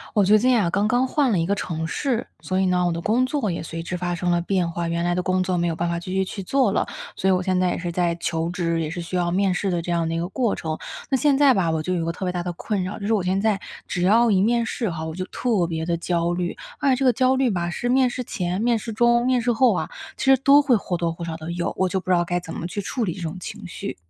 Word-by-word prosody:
我 205 - +5
最 210 +3 +6
近 250 +1 +3
啊， 190 - +2
刚 200 +1 +1
刚 245 +3 +2
换 275 -1 +2
了 200 - +2
一 165 - +1
个 200 - +1
城 160 -5 -3
市， 240 - -1 0.2
所 185 0 -1
以 190 - +2
呢， 180 -1 +2
我 - - +1
的 165 - -2
工 230 +7 +2
作 260 -7 -1
也 170 - -3
随 165 0 -6
之 180 - -4
发 175 0 -2
生 175 +1 -1
了 175 0 +2
变 180 -1 0
化。 170 0 -3
原 170 0 -1
来 175 - +1
的 180 - 0
工 185 0 +1
作 185 -1 -1
没 175 0 +1
有 165 - -1
办 170 +1 -1
法 170 0 -1
继 180 +2 -7
续 190 0 +1
去 195 - -6
做 265 +8 +2
了， - - 0 0.3
所 - - -1
以 - - +5
我 185 -1 +2
现 185 0 +1
在 185 -1 +2
也 - - -1
是 175 0 -3
在 170 -1 0
求 165 -1 -2
职， 170 -2 -1
也 155 - -2
是 175 +3 -5
需 170 +2 -5
要 175 -1 +1
面 190 +1 +1
试 195 +2 -1
的 175 -1 0
这 175 - -3
样 170 -1 +1
的 165 - -2
一 - - -1
个 170 +1 -2
过 235 +1 0
程。 160 -1 -3 0.3
那 270 - +2
现 285 0 +3
在 280 -2 +6
吧， 180 -6 +1
我 160 -1 -1
就 185 - -1
有 175 - 0
一 - - -2
个 165 - 0
特 190 - -5
别 180 - 0
大 180 -1 -3
的 175 0 -3
困 195 +2 -2
扰。 185 +3 -4
就 200 - -6
是 220 - +1
我 210 - +2
现 185 +2 +1
在 210 -1 +1 0.3
只 175 - -2
要 225 +5 +4
一 190 -2 +3
面 235 +3 +2
试 230 -1 -2
哈， 160 -2 -4
我 160 - -5
就 185 +3 -4
特 210 -8 0
别 160 -1 -3
地 170 - 0
焦 170 0 0
虑。 175 0 -3 0.2
而 280 - +2
且 260 - +4
这 265 +1 -1
个 250 - +5
焦 255 +3 +3
虑 260 -1 +2
吧 175 -3 -1
是 240 +7 -3
面 255 +1 +3
试 250 +1 -4
前、 185 -6 -3
面 235 0 +2
试 225 - -6
中、 235 +2 +3
面 255 -1 +3
试 240 +1 +1
后 250 +2 +4
啊， - - -2 0.3
其 - - -3
实 270 0 +6
都 280 +2 +6
会 265 -4 +3
或 185 -4 -2
多 170 -1 -1
或 170 - -8
少 165 -1 -4
地 160 +1 -6
有， 175 0 -2
我 190 - +2
就 190 +1 -1
不 185 - -9
知 180 - +5
道 175 - +2
该 175 +1 -1
怎 165 -2 -9
么 - - -5
去 200 +4 -3
处 235 +4 -3
理 180 -6 -1
这 185 - -9
种 165 +2 -4
情 210 - -8
绪。 200 +3 -6
185 Hz, 350 characters per minute, -23 LUFS, 170-225 Hz, 0.3 s, 最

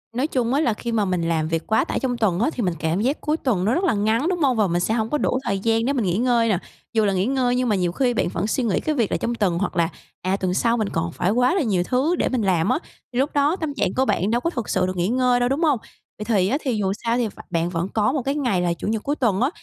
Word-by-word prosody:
Nói 260 +4 +1
chung 250 -5 0
á 285 - +2
là 240 -8 +2
khi 235 +2 -5
mà 215 -3 +1
mình 180 -2 -1
làm 165 -2 0
việc 165 0 -2
quá 220 0 +3
tải - - -2
trong 250 -2 -1
tuần 195 -6 +1
á, 240 - +2
thì 245 - -2
mình 180 -3 0
cảm 165 +4 0
giác 265 +6 0
cuối 305 +1 0
tuần 210 - 0
nó 220 - +2
rất 350 - 0
là 355 - +3
ngắn, 220 +7 +1
đúng 360 -1 -1
hông? 270 -6 +2
Và 210 -2 +3
mình 175 0 0
sẽ 215 +5 0
hổng 220 -1 0
có 300 - +1
đủ 260 - 0
thời 195 -5 -1
gian 225 +2 +1
để 280 - +1
mình 240 -7 0
nghỉ 180 +1 0
ngơi 235 -1 +2
nè. 195 - +2 0.4
Dù 220 -2 +3
là 200 - +1
nghỉ 185 +1 +1
ngơi 250 -1 +1
nhưng 250 -1 0
mà 210 - +3
nhiều 180 -2 0
khi 245 +6 +1
bạn - - 0
vẫn 205 - -1
suy 250 +4 0
nghĩ 210 -6 +1
cái 310 - -1
việc 230 -7 0
là - - +1
trong 235 - -2
tuần, 190 -6 +1
hoặc 200 - -2
là, 170 -1 +2 0.3
à, 190 +2 0
tuần 185 -2 -1
sau 230 +5 +2
mình 215 -3 -1
còn 165 0 -2
phải 180 +4 0
quá 250 - +2
là 375 - +2
nhiều 195 -8 +1
thứ 265 - +1
để - - 0
mình 255 -3 0
làm 185 -2 +1
á, 255 - +2 0.3
thì 245 - -1
lúc 275 +2 0
đó 290 +4 +2
tâm 315 -6 -4
trạng 195 -9 -1
của 260 +1 +1
bạn 200 -1 0
đâu 240 - +1
có 335 - 0
thực 235 -10 -5
sự 185 -1 +1
được 185 - -4
nghỉ 175 +1 +1
ngơi 250 +1 +2
đâu, 245 +1 +1
đúng 285 +5 0
hông? 295 -7 +3 0.4
Vậy 210 - -6
thì 200 -5 +2
á 260 +8 +1
thì 255 -4 -1
dù 195 -2 0
sao 235 0 +1
thì 240 -2 +1
v 205 - -12
bạn 170 -1 0
vẫn 175 +1 -2
có 215 +2 +2
1 290 - -1
cái 275 +3 -2
ngày 245 -11 0
là 175 -1 +1
Chủ 170 - -6
nhật 220 -1 -1
cuối 290 - -1
tuần 225 -8 +1
á, 260 - +3
230 Hz, 335 wpm, -22 LUFS, 190-255 Hz, 0.4 s, quá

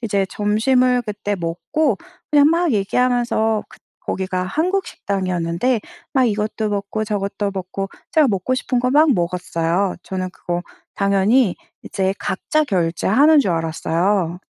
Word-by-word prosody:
이제 200 -4 0
점심을 250 +4 +2
그때 205 -1 -3
먹고 180 - -1 0.3
그냥 290 -1 +6
막 335 -1 +2
얘기하면서 225 0 +1
그 - - -17 0.2
거기가 185 -1 -2
한국 350 - 0
식당이었는데 185 +4 -1 0.3
막 260 -2 +3
이것도 215 0 -1
먹고 205 +2 -2
저것도 200 -1 -2
먹고 195 +1 -4 0.2
제가 310 -3 +4
먹고 200 +5 0
싶은 250 -1 -1
거 250 0 +1
막 300 +1 +5
먹었어요. 175 +1 -1
저는 185 -1 -4
그거 175 -1 -4 0.3
당연히 200 +2 +3 0.3
이제 190 0 -1
각자 305 +10 0
결제하는 210 - +3
줄 200 - 0
알았어요. 170 +2 0
205 Hz, 295 characters per minute, -20 LUFS, 185-250 Hz, 0.3 s, 그냥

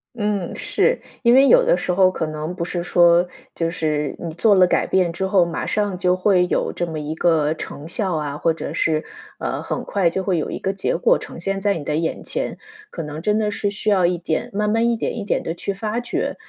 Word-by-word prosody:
嗯， 205 -5 -2
是。 - - +1 0.2
因 235 +1 +5
为 270 +1 +7
有 - - +6
的 - - +3
时 180 - -1
候 185 0 +4
可 160 - -3
能 155 +2 -4
不 170 -2 -3
是 175 0 -3
说， 175 0 +4 0.3
就 165 -1 -1
是 150 -3 -1
你 165 -2 -5
做 210 +5 +3
了 185 -1 +6
改 - - +1
变 180 -3 +1
之 190 +3 -2
后， 190 -2 +3
马 170 - -4
上 205 -3 -1
就 180 0 +1
会 185 -2 +3
有 - - -1
这 175 - -1
么 160 -2 -5
一 150 +1 -4
个 160 -3 +2
成 155 -1 -8
效 185 0 -1
啊， 150 -2 -3
或 165 - +1
者 160 - -6
是， 155 -1 0 0.3
呃， - - -3
很 - - -4
快 190 -4 +1
就 190 +3 -2
会 185 -3 0
有 155 - -2
一 - - -4
个 195 0 -1
结 195 - -1
果 - - +3
呈 - - -9
现 195 +2 -2
在 200 -2 +1
你 145 - -7
的 150 - -1
眼 165 +1 -2
前。 - - -3 0.3
可 165 - -6
能 150 +1 -6
真 210 +3 +1
的 210 -1 0
是 205 0 -1
需 210 +1 -2
要 190 -4 +4
一 175 0 +1
点 160 -2 -2
慢 210 +1 0
慢 225 +2 +2
一 235 - 0
点 235 - -3
一 210 - -3
点 - - 0
地 165 - -3
去 185 +3 -4
发 215 +4 -3
掘。 240 - -2
180 Hz, 265 characters per minute, -21 LUFS, 165-205 Hz, 0.3 s, 为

